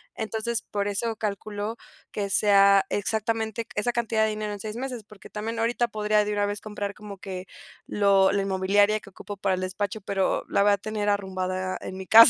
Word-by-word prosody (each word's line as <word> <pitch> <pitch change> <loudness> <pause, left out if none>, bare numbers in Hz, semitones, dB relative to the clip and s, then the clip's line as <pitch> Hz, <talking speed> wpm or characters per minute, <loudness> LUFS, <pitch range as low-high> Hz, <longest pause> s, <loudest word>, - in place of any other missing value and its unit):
Entonces, 220 +1 -2
por 205 0 -2
eso 220 +3 -1
calculo 205 0 -3 0.4
que 200 -2 -2
sea 200 -1 +6
exactamente 220 +2 -1
esa 210 +4 +1
cantidad 230 -2 +1
de 220 - +3
dinero 215 -1 -3
en 205 - -6
6 215 +2 -5
meses, 250 -4 -4
porque 210 -1 -14
también 225 +2 -4
ahorita 240 +1 +2
podría 210 -1 -4 0.2
de 210 - -2
una 205 0 +1
vez 205 0 -3
comprar 205 -1 -4
como 205 -2 -9
que 185 -1 -6 0.4
lo 195 -2 +4
la 200 0 +1
inmobiliaria 200 +2 +3
que 200 - -13
ocupo 205 +1 -8
para 195 -1 +1
el 185 - -4
despacho, 200 +3 -2
pero 195 -1 0
la 200 - +3
voy 205 - +5
a 200 - +4
tener 210 0 -2
arrumbada 185 -2 -1
en 190 - -6
mi 190 -1 -7
casa. 230 +2 +10
205 Hz, 200 wpm, -26 LUFS, 195-220 Hz, 0.4 s, casa